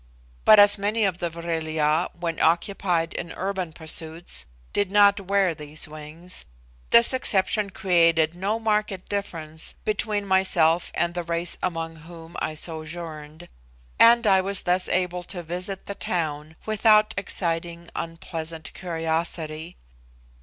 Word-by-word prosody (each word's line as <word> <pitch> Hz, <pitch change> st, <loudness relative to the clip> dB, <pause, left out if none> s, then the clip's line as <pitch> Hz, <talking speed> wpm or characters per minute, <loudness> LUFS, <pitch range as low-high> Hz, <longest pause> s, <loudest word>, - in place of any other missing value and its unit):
But 215 Hz, -, +8 dB
as 205 Hz, 0 st, +8 dB
many 210 Hz, +3 st, 0 dB
of 185 Hz, -3 st, -1 dB
the 175 Hz, -, -1 dB
Vril 165 Hz, -1 st, -4 dB
ya, 155 Hz, +2 st, +1 dB
when 170 Hz, -2 st, -3 dB
occupied 170 Hz, -1 st, +1 dB
in 170 Hz, -, -5 dB
urban 190 Hz, -3 st, -3 dB
pursuits, 160 Hz, -, -3 dB, 0.3 s
did 205 Hz, -2 st, +1 dB
not 205 Hz, 0 st, +5 dB
wear 195 Hz, -2 st, +1 dB
these 150 Hz, 0 st, -5 dB
wings, 155 Hz, +4 st, -7 dB, 0.5 s
this 235 Hz, +2 st, +6 dB
exception 210 Hz, -4 st, +2 dB
created 165 Hz, -4 st, +3 dB
no 195 Hz, +5 st, -1 dB
marked 210 Hz, -4 st, -1 dB
difference 165 Hz, -6 st, -4 dB
between 210 Hz, -1 st, -1 dB
myself 180 Hz, -3 st, +3 dB
and 170 Hz, 0 st, 0 dB
the 175 Hz, -, -2 dB
race 170 Hz, +1 st, -1 dB
among 165 Hz, -2 st, -3 dB
whom 165 Hz, +1 st, -12 dB
I 155 Hz, -, -3 dB
sojourned, 160 Hz, 0 st, -6 dB, 0.5 s
and 235 Hz, 0 st, +7 dB
I 190 Hz, -2 st, +5 dB
was 195 Hz, 0 st, -3 dB
thus 180 Hz, +1 st, +1 dB
enabled 180 Hz, -1 st, -1 dB
to 180 Hz, -3 st, -5 dB
visit 180 Hz, +3 st, -2 dB
the 200 Hz, -, -4 dB
town 155 Hz, -5 st, -3 dB
without 215 Hz, 0 st, +4 dB
exciting 170 Hz, -3 st, -3 dB
unpleasant 165 Hz, -1 st, -6 dB
curiosity. 165 Hz, -1 st, -3 dB
175 Hz, 130 wpm, -24 LUFS, 160-195 Hz, 0.5 s, But